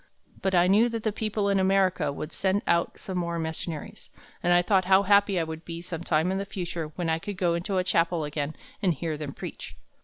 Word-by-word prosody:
But 190 -1 +1
I 175 0 +5
knew 210 +6 +4
that 230 -2 -4
the 215 - +1
people 210 -1 -1
in 200 -1 +3
America 190 -4 +2
would 150 +3 -6
send 190 +1 +1
out 170 0 +1
some 185 -2 -4
more 170 -1 -2
missionaries, 160 -1 -4 0.3
and 175 - +1
I 175 0 +5
thought 190 0 +3
how 190 +1 +5
happy 200 -1 +4
I - - +1
would 160 0 -6
be 170 0 -6
sometime 170 0 -1
in 190 - -1
the - - -1
future 175 -4 -4
when 175 -2 -2
I 160 0 +1
could 200 +3 -6
go 175 -2 +2
into 185 +3 -1
a 185 - +2
chapel 170 -2 +1
again 150 0 -3 0.3
and 180 -5 +2
hear 160 +2 -3
them 150 -2 -5
preach." - - -8
180 Hz, 225 wpm, -27 LUFS, 165-195 Hz, 0.3 s, I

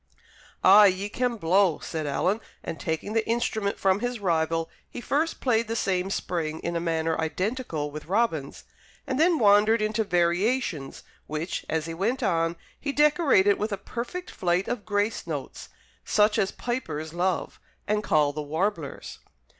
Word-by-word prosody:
"Ay, 205 +2 +9
ye 190 +1 0
can 245 +2 -1
blow," 185 -2 +3
said 155 -2 -4
Alan; 185 +9 0 0.2
and, 160 - -5
taking 160 +6 -3
the 225 -1 0
instrument 220 -3 -1
from 190 0 +2
his 245 0 -3
rival, 165 -3 0 0.2
he - - -7
first 300 +6 -1
played 230 -3 +1
the 225 - -2
same 190 -3 0
spring 160 -5 -2
in 170 0 -3
a - - +1
manner 165 -1 -1
identical 165 - -2
with 150 +1 -8
Robin's; 175 -8 -1 0.4
and 260 +1 -2
then 335 +1 +4
wandered 215 0 +5
into 215 +1 0
variations, 175 - 0 0.2
which, 155 +3 -4
as 160 -1 -1
he 165 - -5
went 230 +10 -1
on, 165 -4 +1 0.2
he 285 - -2
decorated 290 - +4
with 215 +1 -2
a 200 - -1
perfect 250 - -6
flight 180 +1 0
of 245 -4 -4
grace 205 +1 -1
notes, - - -6 0.3
such 210 0 +3
as 195 - +1
pipers 160 -11 -4
love, 180 +1 -1 0.3
and 210 0 0
call 150 -6 +2
the 150 - -4
"warblers." 160 +1 -3
195 Hz, 160 wpm, -26 LUFS, 165-225 Hz, 0.4 s, Ay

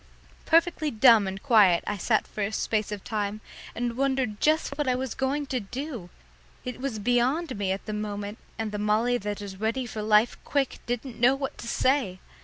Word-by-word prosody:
Perfectly 330 -2 +3
dumb 225 -4 +6
and 190 +1 -5
quiet 210 -10 +5
I 205 - -2
sat 215 +3 +1
for 215 - -7
a 200 +1 0
space 215 -1 -1
of 205 -2 -5
time 210 -1 -2 0.4
and 240 0 -2
wondered 260 -5 0
just 310 -2 +2
what 295 -1 -2
I 255 - +2
was 255 -2 -3
going 275 +2 -1
to 260 -2 -2
do. 245 - -6 0.6
It 250 0 -5
was 265 -5 -2
beyond 250 +7 +1
me 200 -2 -1
at 195 - -3
the 215 - -4
moment, 205 0 -4 0.2
and 220 -1 -3
the 210 - -4
Molly 220 +4 +2
that 205 0 -4
is 195 -2 -8
ready 225 +5 -1
for 220 -2 -5
life 215 +2 +3
quick 280 -2 -1
didn't 245 +1 -4
know 250 +3 +5
what 275 -1 -4
to - - -7
say. 250 -7 +1
230 Hz, 200 wpm, -27 LUFS, 210-265 Hz, 0.6 s, dumb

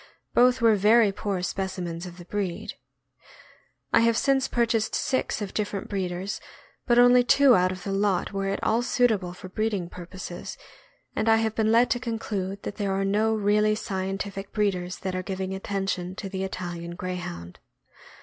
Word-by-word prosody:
Both 250 +1 +4
were 230 -1 +6
very 210 +1 +5
poor 195 -2 -3
specimens 180 -2 -3
of 175 0 -11
the 175 - -11
breed. 190 -2 -3 1.2
I - - +7
have 230 0 +3
since 270 0 +2
purchased 225 -2 +1
six 260 -4 -1
of 195 - -6
different 205 -2 -3
breeders, 190 0 -3 0.5
but 240 -2 +4
only 245 0 +7
two 275 +1 +6
out 185 -3 +3
of 185 0 -7
the 200 - -3
lot 195 -2 0
were 195 0 -1
at 195 - -2
all 225 +2 +2
suitable 230 -7 +1
for 180 +1 -10
breeding 200 -2 -2
purposes, 180 0 -8 0.6
and 225 - +1
I 225 - +7
have 225 -1 0
been 220 -1 +1
led 240 +2 +4
to 245 - +2
conclude 205 -5 -4
that 205 - -5
there 200 -2 -1
are 195 0 0
no 215 +3 +2
really 210 0 +2
scientific 195 0 -4
breeders 185 -4 -1
that 185 -1 -3
are 185 - -1
giving 190 0 -4
attention 190 -2 -3
to 195 0 -6
the 190 0 -3
Italian 175 -2 -5
Greyhound. 175 - -6
195 Hz, 170 wpm, -26 LUFS, 185-220 Hz, 1.2 s, I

